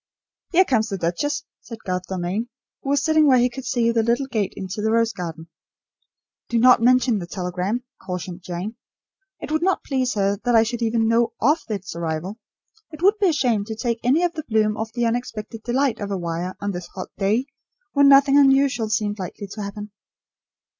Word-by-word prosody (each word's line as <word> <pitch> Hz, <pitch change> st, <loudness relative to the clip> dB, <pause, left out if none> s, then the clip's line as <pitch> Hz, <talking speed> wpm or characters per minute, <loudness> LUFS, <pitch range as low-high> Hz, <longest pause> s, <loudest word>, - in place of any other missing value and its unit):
"Here 370 Hz, +2 st, +5 dB
comes 225 Hz, -7 st, +1 dB
the 195 Hz, -, -3 dB
duchess," 285 Hz, -, -1 dB, 0.2 s
said 230 Hz, -, -9 dB
Garth 180 Hz, -1 st, -3 dB
Dalmain, 190 Hz, +5 st, -3 dB, 0.3 s
who 275 Hz, -, -5 dB
was 285 Hz, 0 st, +2 dB
sitting 315 Hz, -1 st, +4 dB
where 260 Hz, -2 st, +6 dB
he 245 Hz, 0 st, +3 dB
could 265 Hz, +1 st, -8 dB
see 235 Hz, -2 st, +1 dB
the 230 Hz, -1 st, +2 dB
little 235 Hz, +4 st, +1 dB
gate 220 Hz, -7 st, -1 dB
into 190 Hz, +2 st, -5 dB
the 220 Hz, -, +1 dB
rose 230 Hz, 0 st, +2 dB
garden. 165 Hz, -3 st, -6 dB, 1.0 s
"Do 235 Hz, -, +1 dB
not 250 Hz, 0 st, +6 dB
mention 250 Hz, -2 st, +4 dB
the 175 Hz, -, -6 dB
telegram," 185 Hz, +6 st, -3 dB, 0.2 s
cautioned 180 Hz, -1 st, -5 dB
Jane. 185 Hz, +6 st, -5 dB, 0.6 s
"It -, -, -7 dB
would 315 Hz, +1 st, +1 dB
not 375 Hz, +1 st, +1 dB
please 255 Hz, -3 st, -1 dB
her 200 Hz, -1 st, +1 dB
that 245 Hz, -1 st, +2 dB
I 225 Hz, -, +6 dB
should 235 Hz, +1 st, -4 dB
even 225 Hz, 0 st, +1 dB
know 230 Hz, 0 st, +2 dB
of 295 Hz, +7 st, +3 dB
its 200 Hz, -4 st, -4 dB
arrival. 170 Hz, +5 st, -4 dB, 0.5 s
It 310 Hz, +1 st, -10 dB
would 410 Hz, +2 st, +4 dB
be 400 Hz, -, +3 dB
a -, -, +4 dB
shame 245 Hz, -9 st, +1 dB
to 220 Hz, 0 st, -5 dB
take 235 Hz, +1 st, -2 dB
any 275 Hz, +8 st, +3 dB
of 350 Hz, -1 st, +1 dB
the 310 Hz, -, -5 dB
bloom 215 Hz, -1 st, +2 dB
off 220 Hz, 0 st, -4 dB
the 240 Hz, +1 st, -1 dB
unexpected 230 Hz, -2 st, -3 dB
delight 255 Hz, +2 st, 0 dB
of 205 Hz, -1 st, -4 dB
a 200 Hz, -, -1 dB
wire 175 Hz, +1 st, -4 dB
on 205 Hz, 0 st, -2 dB
this 175 Hz, -2 st, -6 dB
hot 185 Hz, -, -6 dB
day, 210 Hz, +6 st, +1 dB, 0.5 s
when 280 Hz, -1 st, +5 dB
nothing 280 Hz, 0 st, +6 dB
unusual 270 Hz, -4 st, +3 dB
seemed 210 Hz, -1 st, -1 dB
likely 185 Hz, +2 st, -6 dB
to 215 Hz, -, -6 dB
happen." 205 Hz, +1 st, -6 dB
225 Hz, 200 wpm, -22 LUFS, 195-255 Hz, 1.0 s, where